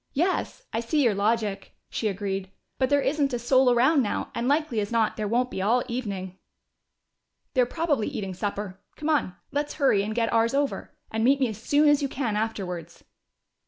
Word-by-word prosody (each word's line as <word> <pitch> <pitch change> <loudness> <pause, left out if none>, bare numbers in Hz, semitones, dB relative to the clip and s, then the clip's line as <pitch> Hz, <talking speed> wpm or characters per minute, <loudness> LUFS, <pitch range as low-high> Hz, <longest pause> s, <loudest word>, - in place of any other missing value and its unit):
"Yes, 370 - 0
I - - 0
see 285 +6 +1
your 235 -4 +4
logic," 210 0 -1
she 220 - -2
agreed. 195 -1 -3 0.3
"But 260 -1 +2
there 285 -1 +3
isn't 280 -2 +1
a - - +1
soul 255 +2 +4
around 260 +5 +4
now, 210 - -2
and 235 +1 -2
likely 290 -5 +1
as 205 +1 -2
not 225 -2 +2
there 215 -1 -2
won't 245 +4 +1
be 190 - -3
all 235 +5 +2
evening." 200 -7 -4 1.1
"They're 250 -3 +3
probably 295 -7 0
eating 195 -2 -4
supper. 200 0 -4 0.2
Come 310 +1 -1
on, 235 -12 +1 0.2
let's 290 +1 -2
hurry 270 -9 +3
and 215 +2 -3
get 230 -1 0
ours 230 +3 +3
over. 285 0 -2
And 220 0 -1
meet 275 +3 +4
me 260 -3 +2
as 215 0 -7
soon 295 +5 +3
as 295 0 +5
you 280 - -1
can 245 -6 -2
afterwards." 180 -6 -4
235 Hz, 195 wpm, -26 LUFS, 205-275 Hz, 1.1 s, as